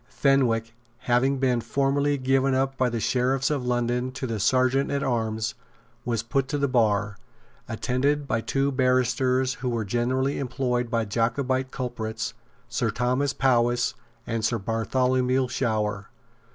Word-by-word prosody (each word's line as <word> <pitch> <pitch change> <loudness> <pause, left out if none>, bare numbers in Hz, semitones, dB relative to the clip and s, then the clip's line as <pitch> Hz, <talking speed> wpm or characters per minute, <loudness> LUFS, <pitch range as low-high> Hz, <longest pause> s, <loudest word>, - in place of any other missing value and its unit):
Fenwick, 120 -5 +1 0.3
having 130 +3 +2
been 125 -3 +1
formally 140 +4 +1
given 135 0 +2
up 135 +1 0
by 130 -1 +1
the 115 -1 -2
Sheriffs 130 +4 +1
of 140 -4 -1
London 125 +1 0
to 130 - -4
the 115 -3 -3
Serjeant 130 +5 +2
at 140 -1 -1
Arms, 110 -3 -1 0.5
was 115 -2 -1
put 135 +3 0
to 145 - -2
the 140 0 +1
bar, 105 -5 +1 0.5
attended 135 +5 0
by 115 - 0
two 135 +4 0
barristers 130 0 +2
who 125 - -1
were 115 -3 -1
generally 130 +5 0
employed 125 -2 -1
by 115 -1 0
Jacobite 125 +5 0
culprits, 115 -3 -4 0.3
Sir 120 -1 -1
Thomas 125 +5 0
Powis 120 -3 +2 0.3
and 115 -1 -2
Sir 115 +1 +1
Bartholomew 125 +4 +1
Shower. 105 -5 -1
125 Hz, 140 wpm, -25 LUFS, 115-135 Hz, 0.5 s, having